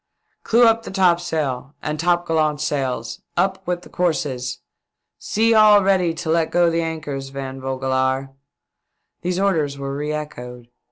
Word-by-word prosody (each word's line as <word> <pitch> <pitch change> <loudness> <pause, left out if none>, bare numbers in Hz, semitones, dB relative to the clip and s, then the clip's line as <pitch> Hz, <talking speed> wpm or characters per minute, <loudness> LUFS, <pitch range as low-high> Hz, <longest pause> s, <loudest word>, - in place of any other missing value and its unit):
" - - -48
Clew 235 +2 +4
up 225 0 +4
the - - -9
topsails 160 -8 0
and 150 0 -3
topgallant 165 -3 +1
sails. 130 -6 -2 0.2
Up 190 0 +1
with 180 0 -2
the - - -14
courses. 130 -7 -2 0.6
See 225 +2 +1
all 210 -2 +7
ready 185 -3 +2
to 165 0 -5
let 165 -1 +2
go 175 -1 +3
the 165 0 0
anchors, 150 -4 -4
Van 135 -1 -6
Vogelaar." 130 0 -1 0.9
These 180 +1 -2
orders 160 -8 +1
were 140 0 -4
re 150 +1 -3
echoed. 125 -5 -7
155 Hz, 150 wpm, -21 LUFS, 135-175 Hz, 0.9 s, all